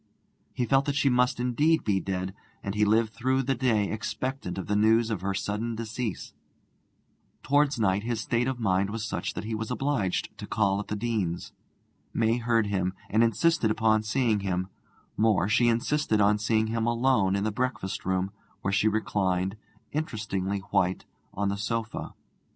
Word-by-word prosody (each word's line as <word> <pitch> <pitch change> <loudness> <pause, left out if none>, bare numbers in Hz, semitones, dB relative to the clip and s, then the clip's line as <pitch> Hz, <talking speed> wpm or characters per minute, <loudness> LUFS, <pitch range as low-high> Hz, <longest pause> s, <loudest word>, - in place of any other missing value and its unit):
He 125 - 0
felt 135 +2 +3
that 145 - -1
she 140 -1 +3
must 125 0 +2
indeed 145 +7 +2
be 100 -2 +1
dead, 95 0 -3 0.3
and 100 - -3
he 105 0 +2
lived 110 +1 +2
through 130 +3 +1
the 135 +1 +1
day 115 -5 +1
expectant 120 -1 -3
of 95 - -3
the 105 - 0
news 110 +2 +4
of 105 -5 -2
her 100 0 -1
sudden 110 +4 -2
decease. 115 -1 -4 1.1
Towards 145 -1 +2
night 100 -2 +2
his 115 0 -2
state 120 +2 0
of 130 -2 -2
mind 100 -2 +1
was 110 +1 -3
such 100 - -3
that - - -4
he 110 +1 -4
was 110 0 -3
obliged 125 -7 -1
to - - -6
call 100 -2 +1
at 105 - -5
the 105 - -2
Deanes'. 105 -6 -2 0.6
May 115 +1 +2
heard 115 -2 +2
him, 95 -2 -1 0.2
and 110 +2 +4
insisted 115 -1 +2
on 110 -1 +4
seeing 110 -1 +1
him; 95 -1 -2 0.5
more, 105 -5 +3
she 120 +3 +3
insisted 120 0 +1
on 105 +1 +4
seeing 110 +1 +2
him 115 +1 -1
alone 115 -5 +2
in 100 - 0
the 110 - 0
breakfast 125 -4 -2
room, 95 +1 0 0.3
where 95 - -1
she 105 +2 +3
reclined, 95 -3 0 0.4
interestingly 100 -9 -2
white, 95 -2 +1 0.3
on 100 +1 -1
the 100 - -2
sofa. 115 +1 -3
110 Hz, 175 wpm, -27 LUFS, 100-120 Hz, 1.1 s, news